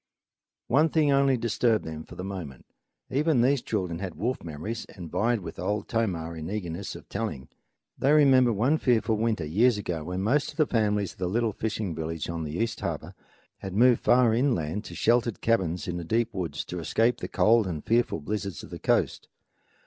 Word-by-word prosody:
One 145 +7 +3
thing 150 -2 +3
only 135 -1 +4
disturbed 115 -1 +1
them 80 0 -6
for - - -12
a 90 - -6
moment. 90 -9 -7 0.5
Even 145 -1 +2
these 135 +1 +3
children 90 -6 -2
had 95 -3 -5
wolf 125 +4 -2
memories 85 +9 -5
and 85 -5 -10
vied 115 0 +1
with 80 -2 -8
Old 105 +3 -2
Tomah 90 -8 -1
in 80 0 -6
eagerness 95 -2 -4
of - - -11
telling. 65 - -4 0.5
They 135 - +3
remembered 130 -5 +5
one 130 +10 +2
fearful 115 -3 +2
winter, 110 -7 0
years 105 +9 +3
ago, 85 -6 -3
when 90 +2 -3
most 140 +7 +2
of - - -11
the 155 - +4
families 105 -6 0
of - - -20
the 90 - -1
little 115 +2 0
fishing 105 -4 -3
village 80 0 -4
on 85 -1 -4
the 75 +2 -5
East 115 +2 -1
Harbor - - -4 0.5
had 95 -1 -6
moved 120 +2 +5
far 120 -2 +4
inland 105 - 0
to - - -8
sheltered 115 -1 +2
cabins 95 -4 0
in 90 -1 -3
the 85 - -4
deep 115 +6 0
woods 90 -4 -3
to 90 - -5
escape 115 +8 +1
the - - -4
cold 110 -1 +3
and 80 -5 -4
the - - -30
fearful 115 -8 +1
blizzards 100 +2 -4
of - - -11
the - - -7
coast. - - 0
105 Hz, 200 wpm, -27 LUFS, 90-120 Hz, 0.5 s, remembered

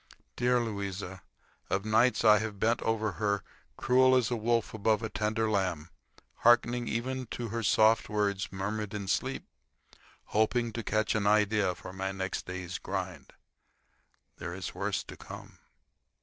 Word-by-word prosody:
Dear 125 0 +2
Louisa! 100 -4 -4 0.5
Of 95 +1 0
nights 115 +3 +3
I 105 -1 +7
have 105 -2 -4
bent 115 +3 +2
over 110 -1 0
her 100 -1 +1 0.3
cruel 130 +1 +4
as 125 -2 +2
a - - +2
wolf 115 0 0
above 110 0 +1
a 110 - -2
tender 110 +1 0
lamb, 90 -6 -1 0.5
hearkening 120 0 +4
even 130 +2 -2
to 120 0 -5
her 115 +2 -2
soft 110 +1 +4
words 100 -2 -1
murmured 105 +2 -3
in 100 -2 -4
sleep, 130 +7 -1 0.9
hoping 115 +2 +2
to 115 - -3
catch 110 0 0
an 105 -2 0
idea 105 -3 +3
for 90 - -10
my 95 0 -3
next 95 -1 -4
day's 90 -1 -5
grind. - - -5 1.0
There - - -5
is - - -5
worse - - -2
to - - -10
come. - - -11
110 Hz, 150 wpm, -30 LUFS, 100-115 Hz, 1.0 s, I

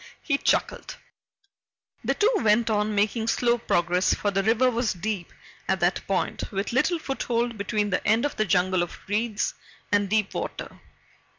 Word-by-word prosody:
he 280 - +1
chuckled. - - 0 1.1
The - - 0
two 440 +3 +3
went 225 +1 +2
on, 210 0 0
making 215 +2 +1
slow 240 0 +2
progress, 180 -3 +1
for 205 - -1
the 195 0 +1
river 235 +5 +3
was 235 -1 0
deep 190 -1 -4 0.4
at 190 0 +2
that 175 +1 +2
point, 195 -2 -2
with 200 +3 -3
little 335 +7 +2
foothold 240 -5 -2
between 205 0 -1
the 180 - 0
end 225 +5 +3
of 290 - -2
the 215 - +1
jungle 185 -1 +2
of 175 - -4
reeds 220 - -1 0.4
and 205 -1 +2
deep 215 -1 +1
water. - - -5
215 Hz, 165 wpm, -25 LUFS, 195-235 Hz, 1.1 s, two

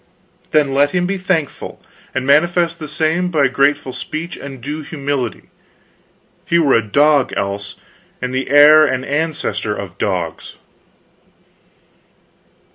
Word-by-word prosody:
"Then 145 -3 +2
let 140 +1 +3
him 180 0 +1
be 195 +1 -2
thankful, 180 -6 -3 0.4
and 130 0 -1
manifest 170 +4 +2
the 155 - -6
same 160 +4 0
by 150 -6 +2
grateful 140 0 +1
speech 160 +6 -6
and 135 -2 -9
due 145 +5 -5
humility; 140 -5 -4 0.9
he 170 - +1
were 150 -5 +3
a 115 - +4
dog, 140 +6 +2
else, 100 +1 -4 0.4
and 125 0 -4
the 130 +1 -2
heir 150 +2 +7
and 130 -3 0
ancestor 140 -9 -2
of 95 -5 -8
dogs." 90 -5 -3
145 Hz, 125 wpm, -17 LUFS, 130-155 Hz, 0.9 s, heir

